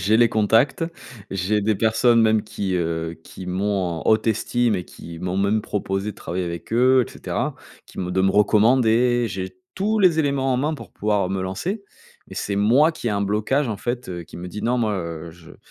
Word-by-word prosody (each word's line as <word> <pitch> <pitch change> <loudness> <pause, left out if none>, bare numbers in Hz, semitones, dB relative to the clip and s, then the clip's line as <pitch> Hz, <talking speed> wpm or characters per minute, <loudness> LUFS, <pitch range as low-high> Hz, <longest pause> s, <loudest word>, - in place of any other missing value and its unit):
j'ai 105 +6 +3
les 120 0 +5
contacts. 115 +8 +2 0.5
J'ai 95 +3 0
des 105 +1 +1
personnes 115 +2 +3
même 110 -1 +3
qui, 100 -3 -3
heu, 80 -1 -2
qui 95 - -10
m'ont 95 +2 0 0.2
en - - -7
haute 110 +1 +3
estime 115 +1 +1
et 90 - -4
qui 85 -1 -11
m'ont 90 +2 -3
même 100 +2 +2
proposé 100 0 -2
de - - -26
travailler 90 -1 -3
avec 85 +3 -6
eux 125 +2 +4
et - - -12
cetera. - - -3 0.3
Qui - - -14
me 90 -1 -3
de 95 +1 +1
me 95 +1 +3
recommander. 115 +3 +3
J'ai 95 -1 -5 0.2
tous 215 +3 0
les 180 -5 +4
éléments 140 -3 +1
en - - +1
main 150 +5 0
pour 115 - -11
pouvoir 105 -3 0
me 95 0 -2
lancer. 180 - -3 0.4
Mais - - -10
c'est 100 - -2
moi 125 +11 +4
qui 140 -6 -4
ai - - 0
un 100 -1 0
blocage 110 +7 0
en 110 - -2
fait, 120 +4 -4
heu, 85 -2 -5
qui 85 - -13
me 85 - -7
dit: 105 - -7
«Non, 125 +1 +1
moi, 110 -3 +1
heu, 85 -2 -5
je, 85 0 -16
heu», - - -14
105 Hz, 220 wpm, -22 LUFS, 95-120 Hz, 0.5 s, les